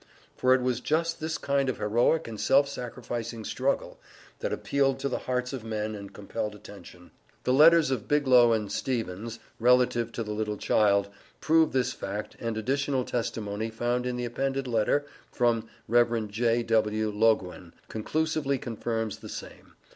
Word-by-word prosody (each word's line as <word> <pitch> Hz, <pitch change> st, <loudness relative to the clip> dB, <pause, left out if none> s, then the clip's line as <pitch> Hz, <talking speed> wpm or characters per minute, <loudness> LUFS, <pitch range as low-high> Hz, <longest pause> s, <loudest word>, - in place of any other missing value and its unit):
For 130 Hz, 0 st, +4 dB
it 130 Hz, -, -1 dB
was 125 Hz, -2 st, 0 dB
just 165 Hz, +2 st, 0 dB
this 160 Hz, 0 st, -2 dB
kind 140 Hz, -1 st, 0 dB
of 130 Hz, -, -2 dB
heroic 120 Hz, +9 st, +2 dB
and 110 Hz, -3 st, -6 dB
self 140 Hz, +4 st, +4 dB
sacrificing 120 Hz, -3 st, -5 dB
struggle, 135 Hz, +2 st, -1 dB, 0.4 s
that -, -, -2 dB
appealed 135 Hz, -1 st, +1 dB
to 140 Hz, +1 st, -2 dB
the -, -, -2 dB
hearts 125 Hz, +1 st, -2 dB
of 130 Hz, -4 st, -5 dB
men 110 Hz, -1 st, -3 dB
and 100 Hz, -1 st, -8 dB
compelled 105 Hz, +1 st, -5 dB
attention. 90 Hz, -4 st, -13 dB, 0.3 s
The 125 Hz, -, +2 dB
letters 155 Hz, +1 st, +6 dB
of 120 Hz, -6 st, -2 dB
Biglow 130 Hz, -5 st, +5 dB
and 105 Hz, -3 st, 0 dB
Stevens, 115 Hz, -3 st, -3 dB, 0.2 s
relative 120 Hz, -1 st, +3 dB
to 115 Hz, -, -3 dB
the 105 Hz, -, -6 dB
little 105 Hz, 0 st, -2 dB
child, 100 Hz, -1 st, +2 dB, 0.3 s
prove 160 Hz, 0 st, +3 dB
this 130 Hz, -2 st, 0 dB
fact, 105 Hz, +2 st, -5 dB
and 115 Hz, -1 st, -3 dB
additional 135 Hz, +2 st, 0 dB
testimony 110 Hz, -2 st, -3 dB
found 120 Hz, +2 st, -1 dB
in 125 Hz, -, -2 dB
the 125 Hz, -, -2 dB
appended 135 Hz, +3 st, -2 dB
letter 120 Hz, +5 st, +1 dB, 0.3 s
from 115 Hz, -2 st, +1 dB, 0.2 s
Rev. 115 Hz, -2 st, +2 dB
J.W. 110 Hz, -1 st, +1 dB
Loguen 105 Hz, -5 st, +1 dB, 0.2 s
conclusively 150 Hz, +4 st, -1 dB
confirms 115 Hz, -2 st, -3 dB
the -, -, -10 dB
same. -, -, -10 dB
120 Hz, 155 wpm, -28 LUFS, 110-135 Hz, 0.4 s, letters